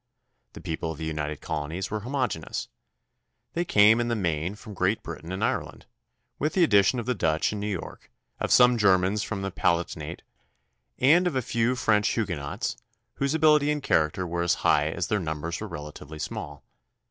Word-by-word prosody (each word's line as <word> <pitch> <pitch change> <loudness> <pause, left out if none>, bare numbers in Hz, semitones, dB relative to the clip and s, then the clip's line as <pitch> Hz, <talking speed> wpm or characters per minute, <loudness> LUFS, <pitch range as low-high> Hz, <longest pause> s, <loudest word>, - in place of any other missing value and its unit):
The - - -10
people 80 0 -3
of 80 - -7
the 80 - -5
United 75 -2 -3
Colonies 80 +5 -4
were 110 - -1
homogeneous. 125 - -3 0.8
They 170 - 0
came 110 -6 +5
in 120 - -1
the 120 - 0
main 85 -2 -1
from 105 0 -11
Great 100 +3 0
Britain 85 +1 -7
and 95 - -3
Ireland, - - -3 0.5
with 150 +2 0
the 185 - +4
addition 105 -3 +4
of 120 - -3
the 125 - +1
Dutch 80 -4 0
in 105 - -4
New 105 - -3
York, 95 -5 -6 0.3
of - - -2
some 125 -1 +6
Germans 95 0 +3
from 105 -2 -4
the 95 - -3
Palatinate, 85 -2 -1 0.7
and 165 +8 +5
of 165 - -2
a 130 - 0
few 120 +2 +1
French 105 -3 +2
Huguenots 85 -11 -2 0.4
whose 140 +2 0
ability 150 -2 +4
and 150 -1 -1
character 80 +4 +1
were 85 0 -2
as 85 - +2
high 75 +1 +4
as 85 +2 -2
their 105 - 0
numbers 80 -1 -4
were - - -4
relatively 75 +1 -8
small. 75 -1 -6
95 Hz, 180 wpm, -26 LUFS, 80-120 Hz, 0.8 s, some